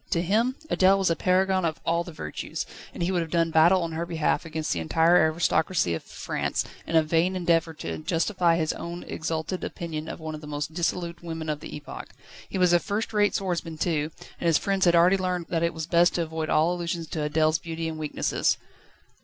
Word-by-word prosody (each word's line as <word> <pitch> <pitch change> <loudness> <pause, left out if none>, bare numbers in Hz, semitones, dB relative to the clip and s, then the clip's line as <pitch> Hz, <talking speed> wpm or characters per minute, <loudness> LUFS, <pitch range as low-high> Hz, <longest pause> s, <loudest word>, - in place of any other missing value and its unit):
To 170 - +1
him 225 +8 +2 0.2
Adèle 190 +1 +5
was 190 -3 +2
a - - +2
paragon 185 +1 +2
of 160 -2 -1
all 170 +1 +1
the 175 - -9
virtues, 155 - -5 0.3
and - - -4
he 175 - +1
would 180 -2 +1
have 165 - -4
done 165 -1 +1
battle 170 +3 +5
on 165 - -3
her 160 +1 -2
behalf 165 -2 0
against 160 -1 -2
the 85 - -2
entire 160 - +3 0.2
aristocracy 160 - +1
of 80 - -3
France, - - -3 0.2
in 165 - -2
a 160 - +6
vain 165 +4 +1
endeavour 165 -2 +1
to - - -5
justify 170 +2 +1
his 160 -2 0
own 170 +1 -6
exalted 160 +3 -3
opinion 160 -2 -5
of - - -6
one 160 -1 -5
of 155 - -7
the 150 - -9
most 150 +1 -4
dissolute 170 0 -2
women 160 -2 -5
of 150 -1 -1
the - - -8
epoch. 150 - -8 0.4
He - - -3
was 180 -1 +4
a 175 - +6
first 215 +4 -3
rate 205 -1 +3
swordsman 175 -4 -2
too, 155 -2 0 0.3
and 170 - -1
his 165 -2 +5
friends 195 -1 +1
had 175 -1 +5
already 175 +3 +5
learned 180 -2 -2
that 165 -2 0
it 170 0 +2
was 160 -2 -5
best 170 +1 +3
to 170 - +1
avoid 160 -1 -4
all 160 +3 +3
allusions 170 -1 -3
to 150 -2 -2
Adèle's 155 +1 +2
beauty 165 0 -4
and 160 -1 -5
weaknesses. 150 -1 0
170 Hz, 220 wpm, -26 LUFS, 160-180 Hz, 0.4 s, a